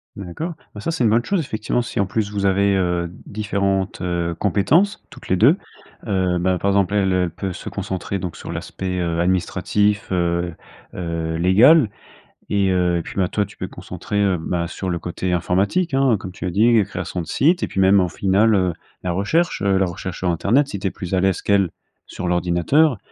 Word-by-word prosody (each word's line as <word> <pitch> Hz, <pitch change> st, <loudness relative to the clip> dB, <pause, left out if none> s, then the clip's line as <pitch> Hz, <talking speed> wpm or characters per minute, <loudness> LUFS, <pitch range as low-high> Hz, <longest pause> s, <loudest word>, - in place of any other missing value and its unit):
D'accord. 100 Hz, -, -5 dB, 0.2 s
Bah 105 Hz, -, -8 dB
ça 165 Hz, -, -2 dB
c'est 160 Hz, -, -1 dB
une 115 Hz, -, +4 dB
bonne 115 Hz, +3 st, +2 dB
chose, 195 Hz, -4 st, +1 dB
effectivement, 110 Hz, -2 st, -2 dB
si 115 Hz, -, -4 dB
en 100 Hz, -, +3 dB
plus 105 Hz, +1 st, -2 dB
vous 100 Hz, -1 st, -2 dB
avez, 100 Hz, +1 st, +3 dB
heu, 90 Hz, -2 st, 0 dB
différentes, 100 Hz, -2 st, -1 dB
heu, 85 Hz, -2 st, -1 dB
compétences, 145 Hz, -, +2 dB
toutes -, -, -13 dB
les 95 Hz, -, +2 dB
2. 130 Hz, -, +5 dB, 0.5 s
Heu 95 Hz, -3 st, +1 dB
bah 90 Hz, +1 st, +1 dB
par 100 Hz, -, 0 dB
exemple 100 Hz, 0 st, +2 dB
elle, 95 Hz, -2 st, +2 dB
elle 90 Hz, -1 st, +1 dB
peut 95 Hz, +2 st, -5 dB
se -, -, -9 dB
concentrer 100 Hz, -1 st, -4 dB
donc 90 Hz, -2 st, -5 dB
sur -, -, -9 dB
l'aspect, 90 Hz, -1 st, -4 dB
heu, 85 Hz, -1 st, -1 dB
administratif, 100 Hz, +3 st, +1 dB
heu 85 Hz, -1 st, 0 dB, 0.4 s
heu, 85 Hz, -2 st, -3 dB
légal. 110 Hz, -, +6 dB, 0.6 s
Et 100 Hz, -2 st, +2 dB
heu, 90 Hz, -1 st, +2 dB
et -, -, -1 dB
puis, -, -, -9 dB
bah, 95 Hz, -, +2 dB
toi 105 Hz, +2 st, -1 dB
tu 100 Hz, -, -15 dB
te -, -, -44 dB
peux -, -, -2 dB
concentrer, 105 Hz, 0 st, -4 dB
heu, 95 Hz, -3 st, +2 dB
bah 85 Hz, +1 st, -2 dB
sur 95 Hz, +2 st, -5 dB
le 85 Hz, -, -1 dB
côté 90 Hz, +2 st, -3 dB
informatique, 100 Hz, -, 0 dB
hein, 135 Hz, -5 st, +3 dB
comme 95 Hz, -1 st, -7 dB
tu 95 Hz, -, -7 dB
l'as 90 Hz, -, -1 dB
dit, 110 Hz, +4 st, +4 dB
création 90 Hz, -, -4 dB
de 80 Hz, -, -8 dB
site. 165 Hz, -, +2 dB
Et -, -, 0 dB
puis 95 Hz, -, -4 dB
même 95 Hz, +1 st, +5 dB
au 90 Hz, -, 0 dB
final, 100 Hz, +5 st, +2 dB
heu, 90 Hz, -3 st, +1 dB, 0.3 s
la 90 Hz, -, -1 dB
recherche, 105 Hz, -, 0 dB
heu, 100 Hz, -1 st, +2 dB
la 95 Hz, -, +3 dB
recherche 90 Hz, 0 st, -5 dB
sur 90 Hz, -2 st, 0 dB
internet 115 Hz, -, +2 dB
si 100 Hz, -, -5 dB
tu 95 Hz, -, -1 dB
es -, -, -2 dB
plus 90 Hz, 0 st, -7 dB
à 95 Hz, -, +3 dB
l'aise 95 Hz, -1 st, +1 dB
qu'elle 100 Hz, -3 st, +2 dB, 0.4 s
sur 90 Hz, -, -5 dB
l'ordinateur. 90 Hz, -, +2 dB
95 Hz, 215 wpm, -21 LUFS, 90-105 Hz, 0.6 s, légal